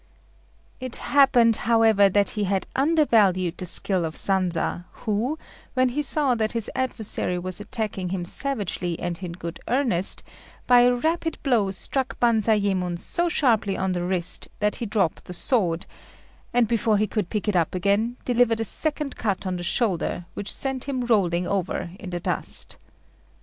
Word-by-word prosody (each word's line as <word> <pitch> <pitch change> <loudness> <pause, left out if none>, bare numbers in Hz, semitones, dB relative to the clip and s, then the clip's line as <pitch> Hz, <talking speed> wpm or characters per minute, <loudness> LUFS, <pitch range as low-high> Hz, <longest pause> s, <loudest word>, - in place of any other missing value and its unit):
It 255 -2 -5
happened, 250 -5 +4
however, 220 -3 +5
that 200 +1 +2
he 210 -1 -2
had 195 0 -1
undervalued 220 - +3
the 180 - 0
skill 185 0 +4
of 160 -1 -4
Sanza, 180 -2 0 0.2
who, 225 +8 -1 0.4
when 255 0 +3
he 280 +5 -1
saw 290 -2 +2
that 220 -2 -1
his 230 -3 -2
adversary 220 -7 -2
was 185 +2 -3
attacking 210 -5 -4
him 180 -1 -3
savagely 185 -7 -3
and 175 0 -4
in 175 -2 -5
good 170 -1 -7
earnest, 235 -8 +1 0.4
by 245 0 +6
a 245 0 +5
rapid 325 +4 -1
blow 235 -8 +2
struck 260 +7 -3
Banzayémon 205 -6 +1
so 345 - -1
sharply 225 -11 +1
on 190 0 -1
the 175 -1 -2
wrist 180 -1 0
that 210 0 0
he 235 - -4
dropped 200 -6 -1
the 180 - -7
sword, 175 -6 0 0.7
and, 240 -1 +3
before 225 -1 +2
he 210 - +2
could 205 -3 -3
pick 210 0 -3
it 210 - +1
up 170 0 +1
again, 205 +6 0
delivered 240 -2 +2
a 225 - -1
second 300 +3 -2
cut 200 -4 -2
on 185 -1 -2
the 175 - -6
shoulder, 175 -2 -1
which 205 - -4
sent 265 -2 -3
him 260 -3 -2
rolling 180 -7 +2
over 185 -3 -2
in 185 - -7
the 175 -1 -3
dust. - - 0
210 Hz, 165 wpm, -24 LUFS, 185-245 Hz, 0.7 s, by